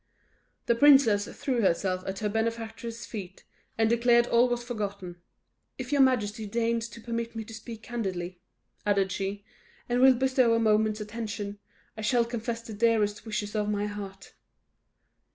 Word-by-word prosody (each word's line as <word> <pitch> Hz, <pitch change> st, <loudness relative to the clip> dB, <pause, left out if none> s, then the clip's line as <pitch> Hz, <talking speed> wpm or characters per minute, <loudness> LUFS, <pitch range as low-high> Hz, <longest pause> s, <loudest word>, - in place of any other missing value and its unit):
The 235 Hz, -, +3 dB
princess 235 Hz, -6 st, +5 dB
threw 255 Hz, -4 st, -2 dB
herself 185 Hz, -1 st, +1 dB
at 190 Hz, 0 st, -3 dB
her -, -, +3 dB
benefactress' 225 Hz, +1 st, -3 dB
feet, 190 Hz, -4 st, -8 dB, 0.3 s
and 225 Hz, 0 st, +3 dB
declared 235 Hz, +1 st, +4 dB
all 240 Hz, +1 st, +4 dB
was 240 Hz, 0 st, -1 dB
forgotten. 200 Hz, -6 st, -5 dB, 0.6 s
"If 260 Hz, +1 st, -6 dB
your 285 Hz, -1 st, +4 dB
majesty 220 Hz, -5 st, +2 dB
deigns 230 Hz, +1 st, -1 dB
to 230 Hz, -, -11 dB
permit 230 Hz, 0 st, -4 dB
me 225 Hz, -, -4 dB
to 225 Hz, -, -11 dB
speak 225 Hz, 0 st, -9 dB
candidly," 185 Hz, -7 st, -4 dB, 0.4 s
added 200 Hz, -2 st, +1 dB
she, 200 Hz, +1 st, -3 dB, 0.4 s
"and 245 Hz, +1 st, +1 dB
will 265 Hz, 0 st, +7 dB
bestow 255 Hz, -2 st, +3 dB
a -, -, +2 dB
moment's 215 Hz, -1 st, +2 dB
attention, 210 Hz, -2 st, -5 dB, 0.4 s
I 220 Hz, -, -7 dB
shall 235 Hz, +2 st, +2 dB
confess 230 Hz, 0 st, -4 dB
the 225 Hz, -, -8 dB
dearest 215 Hz, -1 st, +1 dB
wishes 210 Hz, -1 st, -3 dB
of 210 Hz, -1 st, 0 dB
my 205 Hz, 0 st, 0 dB
heart!" 200 Hz, -2 st, -7 dB
225 Hz, 155 wpm, -28 LUFS, 205-235 Hz, 0.6 s, will